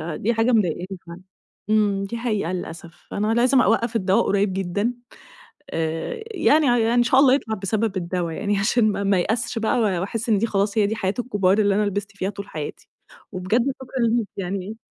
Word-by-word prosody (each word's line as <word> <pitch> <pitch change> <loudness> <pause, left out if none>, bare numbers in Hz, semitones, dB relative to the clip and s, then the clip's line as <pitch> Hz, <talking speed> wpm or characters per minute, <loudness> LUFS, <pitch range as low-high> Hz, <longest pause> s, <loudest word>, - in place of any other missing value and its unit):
دي 235 +4 0
حاجة 225 +3 +2
مضايقاني 185 -5 +1 0.2
فعلًا، 170 +2 -10 0.5
امم 205 -2 +2
دي 230 +4 -4
حقيقة 215 -7 -1
للأسف. 170 -1 -8
أنا 215 +2 0
لازم 250 +2 +4
أوقف 230 +2 +1
الدوا 190 -2 +2
قريب 200 -1 +1
جدًا، 195 +5 -1 0.8
آآ 165 - -3
يعني 315 - +3
ع 240 0 +3
يع 230 +1 +2
إن 240 - +5
شاء 260 +3 +4
الله 265 -2 +6
يطلع 220 -6 -1
بسبب 205 +1 -2
الدوا 175 -2 -2
يعني 205 +2 -1
عشان 215 +1 +2
ما 200 - -3
ما 195 -1 +3
ايأسش 225 +6 -1
بقى 225 +2 +1
وأحس 210 +3 -1
إن 210 -3 +3
دي 230 - +1
خلاص 200 0 0
هي 205 - +4
دي 220 +2 -2
حياة 190 -2 -1
الكبار 205 -5 +1
اللي 205 -2 +3
أنا 210 - +2
لبست 200 0 -4
فيها 190 +1 -2
طول 200 0 -8
حياتي، 150 -2 -7 0.4
وبجد 185 +6 0 0.2
شكرًا 255 -3 -1
ليكِ 230 -2 0
يعني، 195 +3 -4
205 Hz, 195 wpm, -23 LUFS, 190-230 Hz, 0.8 s, الله